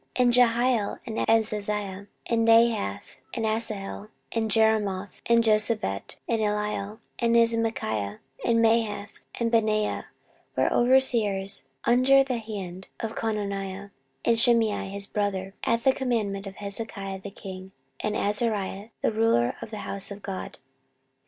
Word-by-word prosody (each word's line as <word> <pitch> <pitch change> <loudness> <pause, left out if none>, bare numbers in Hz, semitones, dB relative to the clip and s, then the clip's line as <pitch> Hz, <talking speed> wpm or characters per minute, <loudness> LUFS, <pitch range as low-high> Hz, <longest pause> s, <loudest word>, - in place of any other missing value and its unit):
14:031:013 250 - +3
And 240 - +4
Jehiel, 240 -2 +3
and 225 -2 -5
Azaziah, 210 -3 0 0.2
and 230 -1 +1
Nahath, 225 - +2 0.2
and 225 - -1
Asahel, 215 -2 -2 0.2
and 225 -1 -1
Jerimoth, 205 -3 +1
and 235 0 +4
Jozabad, 215 - +1
and 230 -2 0
Eliel, 210 0 -2 0.2
and 235 -1 +2
Ismachiah, 225 - +1 0.3
and 230 -1 +3
Mahath, 220 -3 +1 0.3
and 230 -1 0
Benaiah, 215 -2 +1 0.5
were - - +2
overseers 230 -6 +3 0.2
under 260 +3 +5
the 255 -3 -2
hand 190 -4 -7
of 225 -1 -4
Cononiah 200 -2 -3 0.3
and 230 -1 +3
Shimei 225 -5 +3
his 200 0 -3
brother, 195 -2 -2
at 230 0 +1
the 265 -1 +5
commandment 215 -7 -2
of 195 - -8
Hezekiah 200 -1 -4
the 200 - -7
king, 190 -1 -9 0.3
and 210 0 -1
Azariah 205 -1 -1
the - - +3
ruler 215 - +2
of - - -7
the 215 -1 -6
house 195 -1 -2
of 200 0 -9
God. 195 -2 -6
215 Hz, 135 wpm, -26 LUFS, 200-230 Hz, 0.5 s, under